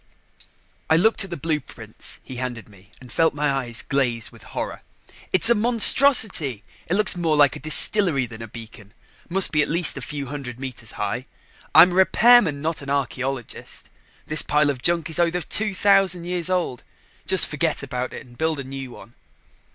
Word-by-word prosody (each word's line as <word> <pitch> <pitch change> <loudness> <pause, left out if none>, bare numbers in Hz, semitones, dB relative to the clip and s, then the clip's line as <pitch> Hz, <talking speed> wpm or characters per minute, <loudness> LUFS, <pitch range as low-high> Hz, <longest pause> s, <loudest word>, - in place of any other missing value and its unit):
I 160 - +4
looked 220 +6 +2
at 195 - -9
the 170 - -6
blueprints 150 -2 -6
he 130 - -10
handed 120 -4 -6
me 100 -1 -20
and 125 -1 -14
felt 165 -2 +1
my 150 -1 0
eyes 125 -4 -3
glaze 120 -5 -1
with - - -17
horror. - - -6 0.5
"It's 185 +4 +8
a 235 - +7
monstrosity! 225 - +3 0.2
It 175 - 0
looks 210 -1 +4
more 165 -3 0
like 145 -2 +4
a - - -8
distillery 155 -2 +2
than 115 -1 -11
a 115 - -7
beacon 110 -2 -13 0.3
must 190 +2 +3
be 150 - +2
at 145 - 0
least 170 0 0
a - - -6
few 145 -2 -5
hundred 130 -3 -8
meters 125 -5 -7
high. 115 +6 -4 0.5
I'm 175 +3 +8
a - - -4
repairman, 190 -4 +4
not 160 -1 -3
an 140 - -9
archeologist. 135 -2 -4 0.4
This 155 0 +2
pile 150 -1 +1
of 130 -3 -8
junk 170 +1 0
is 160 -1 0
over 175 +1 +1
2000 195 -1 +1
years 175 0 -2
old. 180 -9 -2 0.4
Just 190 -1 +4
forget 150 0 -1
about 125 -2 -4
it - - -9
and 120 -1 -18
build 160 +1 -2
a - - -5
new 135 0 -8
one." 120 -1 -14
150 Hz, 180 wpm, -22 LUFS, 130-180 Hz, 0.5 s, It's